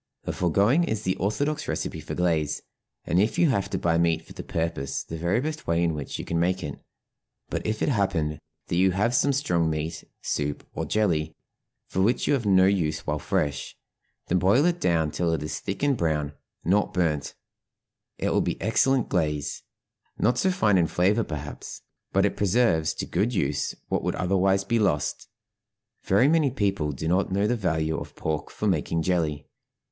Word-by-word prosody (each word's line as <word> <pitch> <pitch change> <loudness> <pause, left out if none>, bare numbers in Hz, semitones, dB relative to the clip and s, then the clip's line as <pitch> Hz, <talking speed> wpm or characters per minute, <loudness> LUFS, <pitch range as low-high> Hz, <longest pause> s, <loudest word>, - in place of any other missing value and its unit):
The - - -3
foregoing 100 - +3
is 110 -5 -2
the 95 -1 0
orthodox 145 +10 -1
recipe - - -3
for - - -6
glaze, 80 -4 0 0.4
and 85 +4 +2
if 110 - 0
you 170 - +4
have 100 -7 0
to - - -1
buy 85 -1 +1
meat 80 -1 +1
for - - -12
the - - -7
purpose 80 -5 -2
the 80 - -7
very 85 +7 +1
best 155 +3 -4
way 85 +1 +2
in 85 -1 +1
which 75 -3 -5
you - - -6
can 85 - -1
make 90 +2 +1
it; 70 - -6 0.7
but - - -2
if 110 0 -1
it - - +2
happen 90 - 0 0.3
that - - -2
you 95 0 +4
have 105 +6 +1
some 140 +3 +3
strong 90 - +1
meat 80 +1 -3 0.2
soup 75 0 -3
or - - -3
jelly, 80 -8 0 0.5
for 95 - -1
which 115 +6 +2
you - - +2
have 120 -6 0
no 95 -1 +6
use 90 -6 +1
while 75 0 -1
fresh, 70 0 -2 0.5
then 90 - +1
boil 100 - +4
it 175 0 +1
down 80 -3 +2
till 85 +1 0
it 75 -2 -2
is 75 - -4
thick 100 +5 -5
and 140 -3 +3
brown 75 -4 0 0.3
(not 95 +4 +2
burnt); 80 -5 0 0.8
it - - -1
will - - +3
be - - -2
excellent 125 +4 +2
glaze; 75 -2 -1 0.6
not 120 +3 +2
so 190 - +3
fine 110 - +3
in 85 - +3
flavor, 100 +8 +2
perhaps, 75 -4 -7 0.3
but 95 +1 +3
it 100 - 0
preserves 100 -6 +2
to - - -3
good 105 +7 0
use 75 -4 0
what - - 0
would - - -1
otherwise 95 +1 +2
be 115 +4 +1
lost. 75 -9 0 0.7
Very 100 +8 +3
many 155 -2 +3
people 100 - 0
do 75 +3 -4
not 90 +2 +1
know 100 +2 +1
the 120 - +2
value 80 -7 0
of - - -9
pork 80 -1 -3
for - - -5
making 85 -2 0
jelly. 80 -5 0
90 Hz, 195 wpm, -26 LUFS, 80-105 Hz, 0.8 s, no